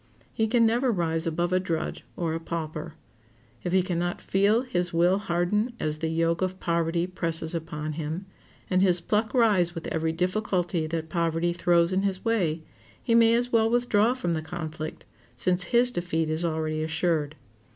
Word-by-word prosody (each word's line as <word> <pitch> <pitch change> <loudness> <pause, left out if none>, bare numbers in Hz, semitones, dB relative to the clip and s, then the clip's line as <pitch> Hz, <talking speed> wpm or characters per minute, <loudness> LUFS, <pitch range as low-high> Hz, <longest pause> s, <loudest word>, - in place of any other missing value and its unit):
He 220 - +1
can 230 +1 +3
never 240 +3 +2
rise 165 -4 -1
above 175 +2 -1
a 185 - +4
drudge 165 -3 -3
or 165 -2 -1
a 165 - -2
pauper. 160 -2 -5 0.7
If 175 - -2
he 185 0 +3
can 175 -2 -2
not 175 0 -2
feel 200 +4 +2
his 180 -8 -1
will 175 +3 +3
harden 205 +5 0
as 155 0 -2
the 160 - -1
yoke 165 +1 0
of 185 0 -2
poverty 170 0 0
presses 165 -3 -1
upon 155 -2 -4
him, 160 +4 -4 0.4
and 185 0 +2
his 180 -2 +4
pluck 210 +5 0
rise 200 -8 +3
with 165 - -6
every 160 0 -1
difficulty 180 -1 -1
that 160 0 -4
poverty 170 +1 0
throws 170 0 +2
in 190 - +2
his 195 0 -2
way, 175 -9 0 0.4
he 230 - -1
may 230 0 +6
as 245 +1 0
well 225 -1 +3
withdraw 240 -1 +2
from 245 -10 -1
the 160 - -1
conflict, 155 -1 -6 0.3
since 180 +7 +1
his 245 +3 +4
defeat 165 -5 -1
is 160 +2 -1
already 155 -1 -1
assured. 160 -2 0
175 Hz, 180 wpm, -26 LUFS, 160-195 Hz, 0.7 s, may